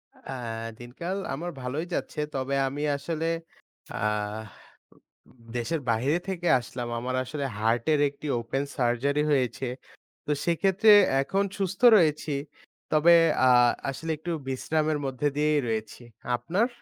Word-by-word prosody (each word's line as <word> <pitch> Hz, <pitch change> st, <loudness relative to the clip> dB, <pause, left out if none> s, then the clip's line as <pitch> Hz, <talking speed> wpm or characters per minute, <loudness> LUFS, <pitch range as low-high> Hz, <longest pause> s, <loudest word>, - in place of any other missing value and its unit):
আ -, -, -11 dB, 0.5 s
দিনকাল 170 Hz, +11 st, -5 dB, 0.2 s
আমার 175 Hz, +5 st, -4 dB
ভালোই 135 Hz, +6 st, -3 dB
যাচ্ছে। 155 Hz, -, -3 dB, 0.2 s
তবে 135 Hz, +1 st, -1 dB
আমি 140 Hz, +2 st, -4 dB, 0.2 s
আসলে 160 Hz, +3 st, -3 dB, 0.7 s
আহ 105 Hz, +1 st, -2 dB, 0.5 s
উ -, -, -27 dB, 0.6 s
দেশের 145 Hz, +7 st, -2 dB
বাইরে 125 Hz, +8 st, +2 dB
থেকে 175 Hz, -2 st, -3 dB
আসলাম। 120 Hz, 0 st, -6 dB
আমার 130 Hz, +2 st, -3 dB
আসলে 140 Hz, +2 st, -4 dB
হার্টের 115 Hz, +7 st, +2 dB
একটি 145 Hz, +2 st, -9 dB
ওপেন 120 Hz, +4 st, -2 dB
সার্জারি 130 Hz, +4 st, +1 dB
হয়েছে। 130 Hz, -1 st, 0 dB, 0.6 s
তো -, -, -2 dB
সেক্ষেত্রে 195 Hz, +5 st, +4 dB, 0.3 s
এখন 195 Hz, +8 st, 0 dB
সুস্থ 195 Hz, -1 st, -3 dB, 0.2 s
রয়েছি। 155 Hz, -3 st, +1 dB, 0.6 s
তবে 155 Hz, +3 st, +6 dB, 0.3 s
আ -, -, +6 dB, 0.4 s
আসলে 160 Hz, +4 st, -4 dB
একটু 170 Hz, +3 st, -5 dB, 0.2 s
বিশ্রামের 155 Hz, +3 st, 0 dB
মধ্যে 135 Hz, +2 st, -1 dB
দিয়েই 150 Hz, 0 st, +3 dB
রয়েছি। 110 Hz, +1 st, -3 dB, 0.3 s
আপনার? 180 Hz, -, 0 dB
140 Hz, 125 wpm, -27 LUFS, 120-165 Hz, 0.7 s, তবে